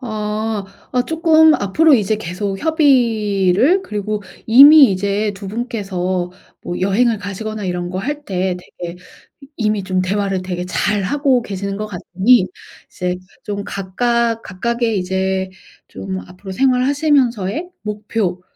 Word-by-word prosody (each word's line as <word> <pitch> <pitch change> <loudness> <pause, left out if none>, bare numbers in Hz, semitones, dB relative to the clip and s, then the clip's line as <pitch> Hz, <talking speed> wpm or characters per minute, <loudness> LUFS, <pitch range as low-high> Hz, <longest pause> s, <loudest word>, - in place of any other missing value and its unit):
어. 215 -2 -3 0.3
어 250 - +2
쪼끔 320 -1 +5
앞으로 295 +11 +3
이제 215 -2 +1
계속 195 +1 -4
협의를 245 - +2
그리고 210 - -4 0.2
이미 280 +3 +9
이제 200 +2 -1
2 195 0 -8
분께서 190 -6 -3 0.3
뭐 175 - -4
여행을 215 +4 +2
가시거나 210 +2 -5
이런 175 -1 -3
거 185 - -4
할 290 +7 -4
때 185 -1 -1
되게 175 -1 -9 0.6
이미 215 -3 0
좀 185 -1 0
대화를 195 0 -1
되게 180 -1 -4
잘하고 240 +8 +1
계시는 200 -1 -4
것 215 +1 -4
같으니 190 +3 +2 0.4
이제 180 0 -3 0.3
좀 200 -1 -4
각각 230 +4 -1
각각의 230 +3 -1
이제 190 +1 -1 0.4
좀 190 -1 -6
앞으로 185 +2 -10
생활하시면서의 260 - +1
목표 210 -3 -3
210 Hz, 260 characters per minute, -18 LUFS, 190-240 Hz, 0.6 s, 이미